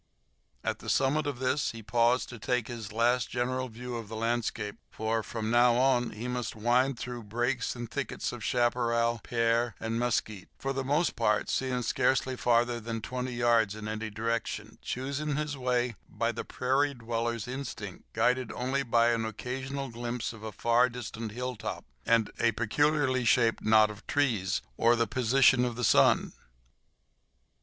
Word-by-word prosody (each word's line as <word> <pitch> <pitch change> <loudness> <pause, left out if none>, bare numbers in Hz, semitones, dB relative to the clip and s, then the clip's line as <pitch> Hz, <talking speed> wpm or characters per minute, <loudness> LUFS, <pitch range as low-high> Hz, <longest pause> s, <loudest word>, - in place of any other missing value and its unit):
At - - -2
the - - -7
summit 145 +3 +2
of 140 -3 -2
this 130 +1 0
he 115 -1 -9
paused 120 +4 +2
to 120 - -9
take 125 +1 0
his 115 -4 -6
last 115 +2 +2
general 130 +1 -1
view 120 +2 -6
of 115 -2 -7
the 110 - -7
landscape 115 -2 -2
for, 110 +1 -1
from 110 0 -4
now 120 0 +5
on, 125 -1 +3
he 110 +4 -6
must 125 -2 -3
wind 120 +4 +2
through 125 0 -5
brakes 120 +5 -1
and 120 -1 -5
thickets - - -3
of - - -8
chaparral, 120 -1 +1
pear, 115 -1 +1
and 115 +1 -2
mesquite, 110 -5 -1
for 135 0 -2
the 135 0 -2
most 145 +6 +1
part 105 -2 +1
seeing 130 -2 -1
scarcely 130 +3 +1
farther 120 0 +2
than 115 0 -4
twenty 125 +3 -4
yards 115 -4 +3
in 110 0 -7
any 110 +1 -3
direction, 110 0 -3
choosing 140 +3 -3
his 150 -1 -2
way 125 -2 0 0.2
by - - -1
the - - -5
prairie 135 +3 0
dweller's 115 -1 -2
instinct, 120 -7 -7
guided 125 +2 +1
only 130 +2 -1
by 120 -2 +3
an 115 -1 0
occasional 130 +4 -4
glimpse 120 0 -4
of 110 - -12
a 110 0 -5
far 120 +4 +3
distant 115 -2 -6
hilltop, 125 +1 -5 0.2
a 115 0 +2
peculiarly 130 +2 +1
shaped 115 -1 +3
knot 110 0 +5
of 105 -1 -13
trees, 120 -10 +1
or 115 +1 +4
the 115 0 +2
position 130 +2 +4
of 120 -2 -1
the 125 - -4
sun. - - +4
120 Hz, 165 wpm, -29 LUFS, 115-125 Hz, 0.2 s, now